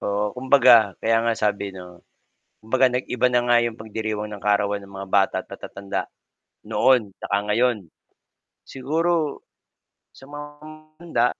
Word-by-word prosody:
Oo, 105 0 -1
kumbaga 125 -6 +5
kaya 115 0 +3
nga 115 0 +1
sabi 100 -2 -1
'no, 90 -1 -12 0.6
kumbaga 130 +4 +3
nag-iba 125 0 0
na 120 - +4
nga 120 - +5
'yong 115 -1 -4
pagdiriwang 110 -1 -4
ng 105 -1 -9
kaarawan 105 0 +1
ng 100 0 -15
mga 95 0 -7
bata 100 -1 +3
at - - -29
matatanda, 100 0 -6 0.6
noon 110 0 +2
saka 100 - -1
ngayon. 120 0 +2 0.9
Siguro 155 +2 -1 0.7
sa 135 - -16
mga 145 0 -8 0.5
handa. 170 -7 +1
110 Hz, 135 wpm, -23 LUFS, 100-130 Hz, 0.9 s, kumbaga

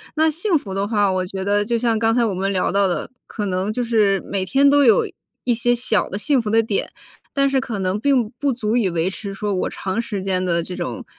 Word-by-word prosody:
那 315 +1 +3
幸 340 +3 +1
福 200 -9 -7
的 195 +1 -1
话， 205 -3 +2
我 185 -1 -1
觉 190 +1 -5
得 205 +1 +1
就 235 +2 0
像 230 -1 +1
刚 225 0 +2
才 245 - +3
我 220 -4 0
们 195 +2 -1
聊 185 - 0
到 200 +1 +2
的， 180 - -3 0.2
可 210 - -4
能 190 +3 -1
就 245 - -1
是 210 -4 +2
每 195 -1 -1
天 275 +8 +4
都 285 0 +5
有 225 -4 +5 0.4
一 245 - +2
些 240 +1 +2
小 230 -5 +1
的 195 - -4
幸 265 +4 +2
福 220 - -4
的 225 +1 +3
点， 215 -2 -1 0.4
但 275 -1 +2
是 270 -1 +2
可 240 -5 -4
能 190 +2 -1
并 250 -3 +2
不 280 -1 +1
足 230 -1 -1
以 225 -5 +2
维 170 +1 0
持 195 +1 -7
说 205 +1 -3
我 185 - -1
长 190 +4 -3
时 205 -5 -5
间 185 -1 0
的 170 -2 +1
这 180 +2 -7
种 - - -5
210 Hz, 275 characters per minute, -21 LUFS, 195-240 Hz, 0.4 s, 都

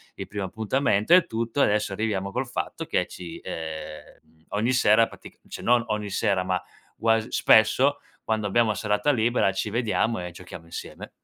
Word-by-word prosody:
il - - -7
primo 100 -1 -4
appuntamento 110 - +1
e 180 0 +7
tutto, 115 +4 -3
e - - +6
adesso 105 0 0
arriviamo 100 -2 -2
col 130 +3 -2
fatto 120 - -4
che - - 0
ci 85 -2 -9
ehm, 80 -1 -5 0.8
ogni 110 +4 0
sera 115 -2 +4
pratic - - -14
cioè, - - -7
non 120 0 +3
ogni 105 -1 -2
sera 95 -1 +1
ma 90 0 -1 0.3
guas 115 0 +1
spesso, 125 +7 +4 0.2
quando 110 -1 -1
abbiamo 115 +3 +2
la 105 - 0
serata 105 +6 +1
libera 120 -5 +2
ci 95 +2 -3
vediamo 115 -1 0
e 90 - -5
giochiamo 85 - -11
insieme. 85 - -8
110 Hz, 175 wpm, -25 LUFS, 100-115 Hz, 0.8 s, e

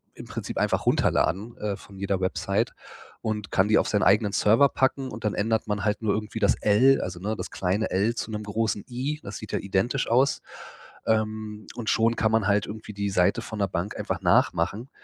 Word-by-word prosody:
im - - -10
Prinzip - - -6
einfach - - +1
runterladen, 105 +7 +1
äh, 105 -1 -2
von 100 -1 -14
jeder 100 -1 -1
Website 95 - 0 0.5
und 105 -2 -3
kann 95 +2 +3
die 110 - +4
auf - - +2
seinen 105 - +1
eigenen 105 0 +4
Server 115 +8 +4
packen, 130 0 0
und 110 +1 -8
dann 105 - 0
ändert 110 +1 0
man 105 -1 -2
halt 105 +1 0
nur 110 -2 +1
irgendwie 110 +2 -4
das 100 - +3
L, 125 +6 +5
also 90 -1 -5
ne, 105 +4 -2
das - - -6
kleine 95 +4 -1
L 105 +6 +1
zu 110 - -4
'nem 105 0 -4
großen 105 0 -1
I, 135 +5 -3
das 100 0 -7
sieht 110 - -9
ja - - 0
identisch 100 +7 0
aus. 130 +4 +3 0.7
Ähm, 110 -1 -1
und 115 -3 -3
schon 115 +1 +2
kann 110 0 +1
man 110 -2 +2
halt 105 0 +2
irgendwie 105 0 -8
die 100 0 -2
Seite 90 -2 +2
von 110 -2 -7
'ner 100 - +2
Bank 90 +3 -3
einfach - - -3
nachmachen. 105 +10 +2
105 Hz, 210 wpm, -26 LUFS, 100-110 Hz, 0.7 s, L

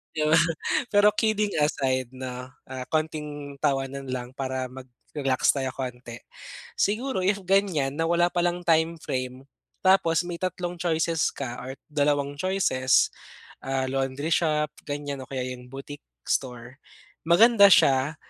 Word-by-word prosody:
'Di 155 -1 +1
ba? 155 - +4 0.5
Pero 205 -1 +5
kidding 215 -2 +1
aside 130 -4 +1
'no, 125 -1 -6 0.2
ah, 130 -1 -6
konting 150 -2 -3
tawanan 135 -1 -1
lang 125 -1 -4
para 130 -2 -3
mag-relax 130 +1 -1
tayo 135 -2 -2
konti, 125 -2 -6 0.6
siguro 220 +1 0
if 195 +2 +1
ganyan 180 -8 +1
na 165 - +1
wala 175 +1 +2
palang 175 0 0
timeframe 160 -6 0 0.4
tapos 180 -3 +4
may 175 -1 -6
tatlong 180 -1 -3
choices 165 -1 +1
ka 125 -3 -5
or 130 +2 -7 0.2
dalawang 145 -1 0
choices, 155 -9 +2 0.5
ah, 135 0 -1
laundry 135 +4 -2
shop 150 -2 +1 0.2
ganyan, 145 -1 -4
o - - -14
kaya 130 -2 -3
'yung 125 -1 -7
boutique 140 +2 -9 0.2
store 125 0 -3 0.5
maganda 200 +4 +7
siya 135 +1 +4
145 Hz, 130 wpm, -26 LUFS, 130-170 Hz, 0.6 s, maganda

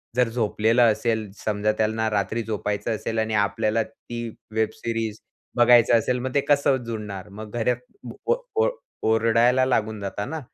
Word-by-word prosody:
जर 125 -1 +3
झोपलेला 115 +1 +2
असेल, 110 -1 0
समजा 105 0 0
त्यांना 110 0 +1
रात्री 105 +2 -1
झोपायचं 105 0 -2
असेल 110 +1 -3
आणि 110 0 -1
आपल्याला 105 +2 +1
ती 120 +1 -7 0.3
वेब 110 -1 +2
सीरीज 115 -2 -3 0.4
बघायचं 120 -1 +6
असेल, 125 +3 0
मग 130 +1 -4
ते 140 - +4
कसं 140 -2 +3
जुळणार? 105 -4 -6
मग 105 +1 -9
घरात 120 +1 +1 0.5
ओ 475 - +4 0.3
ओ - - +3 0.4
ओरडायला 115 +3 +4
लागून 110 -4 0
जाता 100 +1 -4
ना. 160 +4 -4
110 Hz, 155 wpm, -24 LUFS, 105-120 Hz, 0.5 s, बघायचं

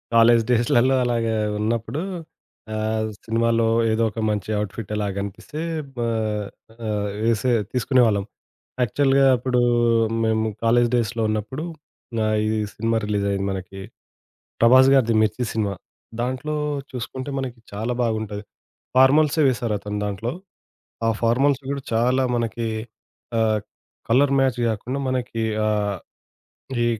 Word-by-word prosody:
College 115 0 +6
డేస్‌లలో 120 +2 +3
అలాగా 115 -2 0 0.3
ఉన్నప్పుడు 115 +7 -1 0.7
ఆహ్, 110 0 -1 0.2
సినిమాలో 115 0 +2 0.2
ఏదో 110 +1 +1
ఒక 110 - -7
మంచి 105 0 -2
ఔట్‌ఫిట్ 105 +1 -6
అలా 105 -1 -1
గనిపిస్తే 100 +9 -6 0.4
బా 120 -1 -1 0.8
ఆహ్, 105 -1 -1 0.2
వేసే 115 +2 +2 0.2
తీసుకునే 125 +1 +2
వాళ్ళం. 100 -3 +1 0.6
యాక్చువల్‌గా 135 +3 +3
అప్పుడు 125 0 0 0.6
మేము 110 0 +1 0.2
కాలేజ్ 120 +1 +4
డేస్‌లో 115 0 -1
ఉన్నప్పుడు, 110 +8 -3 0.5
గా 110 - +1 0.2
ఈ - - +1 0.3
సినిమా 115 +1 0
రిలీజ్ 105 -1 0
అయింది 100 0 -1
మనకి, 95 +1 -7 0.8
'ప్రభాస్' 130 +3 +7
గారిది 115 -4 +3
'మిర్చి' 110 +3 0
సినిమా. 105 -3 -1 0.5
దాంట్లో 130 +5 -2 0.3
చూసుకుంటే, 130 +2 -5
మనకి 125 -3 -5
చాలా 110 +4 -2
బాగుంటది. 110 -2 -2 0.5
ఫార్మల్‌సే 145 +4 +5
వేశారు 120 -4 0
అతను 105 +1 -5
దాంట్లో. 105 +4 -3 0.7
ఆ - - +3
ఫార్మల్స్ 130 +4 +3
గూడా 140 -1 -3
చాలా 125 +3 +2
మనకి 115 0 -2 0.7
ఆహ్, 110 -1 +2 0.5
కలర్ 140 +4 +4
మ్యాచ్ 130 -2 +1
గాకుండా 120 +5 -3
మనకి 125 -3 -2 0.3
ఆహ్, 105 -2 0 0.9
ఈ - - +2
115 Hz, 120 wpm, -23 LUFS, 110-125 Hz, 0.9 s, ప్రభాస్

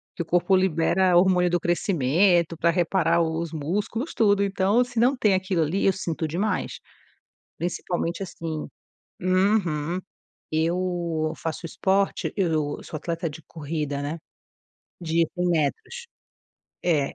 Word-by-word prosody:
que - - -3
o - - -3
corpo 175 +3 +2
libera 185 0 +3
hormônio 180 -1 +4
do 175 0 +1
crescimento 175 0 +2
pra 170 - +2
reparar 170 0 +2
os 165 0 -2
músculos 205 - -3
tudo, 205 -3 +3
então 200 +4 +2
se 245 -2 -4
não 255 +4 +3
tem 210 -5 +3
aquilo 185 -3 +1
ali 165 +6 0
eu 195 - +4
sinto 165 -3 -3
demais, 185 +5 -2 0.8
principalmente 175 +1 -3
assim 165 -4 -5 0.5
uhum, 185 -3 +1 0.5
eu 170 -1 0
faço 165 +1 -4
esporte, 195 +4 0
eu 155 -6 0
sou - - -6
atleta 165 +2 -3
de 160 +2 -11
corrida, 150 -2 -4
né, 150 +4 -4 0.8
de 165 -1 +1
100 180 0 -1
metros, 170 - -1 0.8
é. 150 -6 +1
175 Hz, 130 wpm, -25 LUFS, 160-190 Hz, 0.8 s, hormônio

